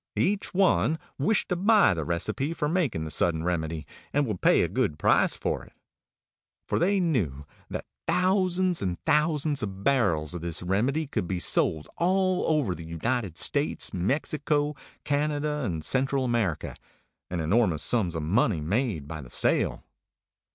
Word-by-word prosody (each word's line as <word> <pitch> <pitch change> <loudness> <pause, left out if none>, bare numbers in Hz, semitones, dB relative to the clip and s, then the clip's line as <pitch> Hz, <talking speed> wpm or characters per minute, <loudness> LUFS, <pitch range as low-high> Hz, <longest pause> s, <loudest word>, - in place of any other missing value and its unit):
Each 200 +1 0
one 185 -4 +2 0.2
wished 200 +10 +1
to 180 - +1
buy 200 - +4
the 80 -2 -3
recipe 110 - -2
for 150 - -1
making 150 - 0
the 80 - -5
Sudden 80 -1 +1
Remedy, 80 -2 -2 0.3
and 145 0 +1
would 105 -7 -4
pay - - +4
a - - +1
good 95 - -1
price - - +3
for - - -2
it. - - -17 0.9
For - - 0
they 195 +3 +2
knew 95 - -1 0.2
that - - -5 0.2
thousands 185 -1 +2
and 90 -3 -2
thousands 150 -2 +2
of 100 -2 -5
barrels 100 - +1
of 90 - -5
this 85 0 -3
Remedy 120 - 0
could 130 -10 -3
be 90 -1 -2
sold 80 -3 +2
all 185 +1 +2
over 150 - +1
the 85 -1 -9
United 90 +3 -2
States, - - +1
Mexico, 145 - 0 0.3
Canada, 150 +1 -1
and 80 -6 -3
Central 135 0 +1
America, 115 - -1 0.5
and 90 - -3
enormous 85 -2 +2
sums 95 -9 +1
of 80 - -2
money 95 +2 +2
made 90 - -1
by 80 -1 -6
the 65 - -12
sale. - - 0
120 Hz, 160 wpm, -27 LUFS, -, 0.9 s, buy